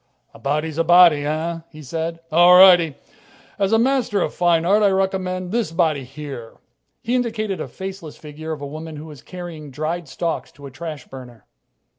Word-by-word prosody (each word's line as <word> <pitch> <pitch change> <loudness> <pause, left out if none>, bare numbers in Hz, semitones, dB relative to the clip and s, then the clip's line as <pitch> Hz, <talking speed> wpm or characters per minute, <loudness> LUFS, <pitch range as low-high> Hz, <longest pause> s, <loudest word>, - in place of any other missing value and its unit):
"A - - -14
body's 150 +3 -2
a - - +4
body, 170 -4 +6
eh?" 165 +2 -2
he 155 -1 -12
said. 165 +4 -4
"All 175 +3 +7
righty. 175 -5 +7 0.6
As 195 -1 +1
a 225 - +5
master 245 -4 +1
of - - -3
fine 170 -2 +2
art, 205 +4 +3
I 205 - +5
recommend 185 -1 -1
this 230 -7 -1
body 160 -5 +1
here." 135 -4 -9 0.5
He 235 +1 -2
indicated 220 -5 -1
a - - -4
faceless 190 -5 -8
figure 155 +1 -8
of 155 -2 -5
a - - -4
woman 155 +2 -8
who 150 +1 -8
was 150 -5 -12
carrying 175 -5 -9
dried 155 +4 -4
stalks 165 +4 -4
to 145 - -13
a 140 - -9
trash 155 +1 -7
burner. 125 -3 -12
165 Hz, 185 wpm, -21 LUFS, 150-185 Hz, 0.6 s, All